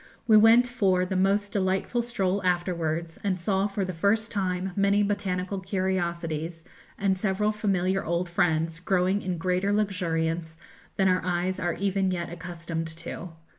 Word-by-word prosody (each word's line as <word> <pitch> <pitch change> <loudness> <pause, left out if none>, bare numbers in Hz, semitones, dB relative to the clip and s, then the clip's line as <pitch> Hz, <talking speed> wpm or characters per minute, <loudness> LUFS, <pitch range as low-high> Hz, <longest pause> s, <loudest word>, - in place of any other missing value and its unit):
We 220 -2 +5
went 225 +3 +7
for 190 -7 +2
the 190 +1 -3
most 200 +2 +2
delightful 195 +4 0
stroll 200 -5 -1
afterwards, 170 -2 -1
and 190 -2 0
saw 190 +3 +1
for 195 -1 -2
the 185 - -4
first 210 +6 +1
time 190 -2 -1
many 200 +1 +3
botanical 195 -2 -1
curiosities, 170 -4 -2 0.3
and 195 -1 +1
several 210 +2 0
familiar 195 -3 0
old 170 +2 -1
friends 165 -1 0
growing 185 +2 +1
in 180 -2 -3
greater 185 +3 0
luxuriance 165 -5 -1 0.4
than 190 - +2
our 185 0 +3
eyes 180 +1 -1
are 175 -1 0
even 195 +1 0
yet 175 -2 -3
accustomed 165 -1 -5
to. 170 +2 -7
185 Hz, 150 wpm, -27 LUFS, 170-200 Hz, 0.4 s, went